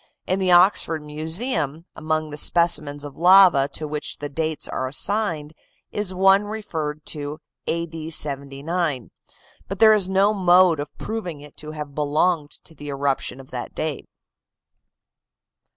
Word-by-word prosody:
In 185 +1 -1
the 185 -1 +1
Oxford 175 -3 +4
Museum, 160 - -1
among 155 0 -2
the - - -5
specimens 150 -3 +2
of 145 - -9
lava 180 -5 +6
to 155 - -3
which 150 0 -5
the 145 - -6
dates 155 +1 -3
are 130 - -3
assigned, 160 0 -1 0.4
is 205 -2 -2
one 195 +2 +4
referred 160 -8 -5
to 150 +1 -4 0.3
A. 170 0 -1
D. 160 -1 -8
79, 140 -1 -1 0.6
but 195 - -5
there 220 +1 +7
is 200 -3 +2
no 195 +2 +3
mode 180 -4 +4
of 145 0 -4
proving 180 -9 -5
it 150 0 -14
to 155 0 -8
have 150 -2 -7
belonged 150 +2 0
to 160 - -15
the 145 -1 -11
eruption 140 -1 -2
of 130 - -14
that 125 -1 -6
date. 155 -2 -4
155 Hz, 150 wpm, -22 LUFS, 145-185 Hz, 0.6 s, there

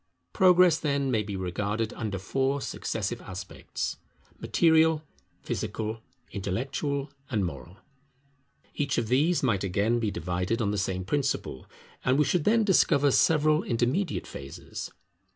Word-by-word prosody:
Progress, 180 -3 +5
then, 140 -3 0
may 110 -3 +2
be 100 -1 -5
regarded 105 +4 -2
under 105 -4 -3
four 135 +8 0
successive 115 -3 -3
aspects: 95 -3 -5 0.4
Material, 160 -1 +3 0.4
Physical, 110 +1 -3 0.3
Intellectual, 135 +8 -2 0.2
and 105 -6 0
Moral. 80 +2 -7 1.0
Each 145 -2 -1
of 110 - -1
these 150 +7 +2
might 105 -7 +1
again 100 +5 +1
be 110 -2 0
divided 90 +4 -2
on 105 -3 0
the 105 - -1
same 95 -1 -2
principle, 115 - -2 0.4
and 130 +1 +3
we 150 - +4
should 170 +2 +1
then 225 +1 +4
discover 145 -8 +4
several 155 +1 +4
intermediate 125 +10 0
phases. 70 0 -8
120 Hz, 130 wpm, -28 LUFS, 100-150 Hz, 1.0 s, Progress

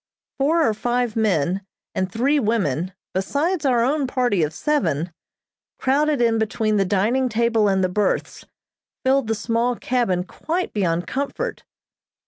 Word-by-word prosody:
Four 310 +3 +3
or 220 - +2
five 240 +1 -1
men 190 -4 +1 0.3
and 185 0 -1
three 275 +8 +2
women 185 - 0 0.2
besides 290 - 0
our 240 -3 +3
own 280 +2 +1
party 245 -8 +1
of 150 -1 +1
seven, 175 - -1 0.6
crowded 290 +2 +2
in 225 -1 +2
between 215 -1 0
the 195 - +2
dining 220 +7 +1
table 230 -1 +2
and 190 -1 +2
the - - +3
berths, 205 +3 -1 0.6
filled 265 -2 +3
the 225 - 0
small 235 +2 0
cabin 235 -8 0
quite 335 - -3
beyond 175 -4 0
comfort. 280 +1 -3
230 Hz, 140 wpm, -22 LUFS, 195-265 Hz, 0.6 s, Four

